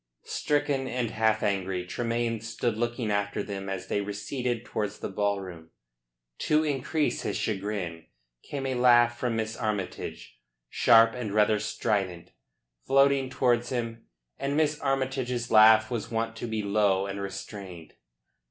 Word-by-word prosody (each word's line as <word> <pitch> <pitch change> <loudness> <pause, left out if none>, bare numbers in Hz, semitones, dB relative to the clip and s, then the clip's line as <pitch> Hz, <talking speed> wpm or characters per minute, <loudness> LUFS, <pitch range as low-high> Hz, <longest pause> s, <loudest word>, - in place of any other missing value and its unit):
Stricken 145 -2 0
and 125 -3 -2
half 110 0 +1
angry, 95 -3 -1
Tremayne 115 +2 -2
stood 115 0 -2
looking 120 -1 -2
after 100 0 -1
them 95 -1 -5
as 95 -1 -4
they 100 - -1
receded 120 +4 -3
towards 105 -1 -3
the - - -5
ballroom. 95 -5 -3 0.7
To 155 +1 +2
increase 145 +1 -1
his - - -2
chagrin 95 -5 -3 0.3
came 140 -2 -5
a 130 - -1
laugh 120 -1 +4
from 120 -2 -1
Miss 110 0 -2
Armytage, 105 -5 -4 0.3
sharp 115 -1 +6
and 110 -5 -4
rather 105 0 +4
strident, 100 -4 -2 0.6
floating 135 -1 +4
towards 120 -2 +1
him, 115 -2 -4 0.3
and 140 +1 -1
Miss 150 -1 +1
Armytage's 130 -3 -1
laugh 110 0 +7
was 115 -4 -3
wont 115 0 -2
to 120 - -4
be 110 -1 -2
low 100 -1 +2
and 100 0 -5
restrained. 95 -3 -8
110 Hz, 140 wpm, -28 LUFS, 100-125 Hz, 0.7 s, laugh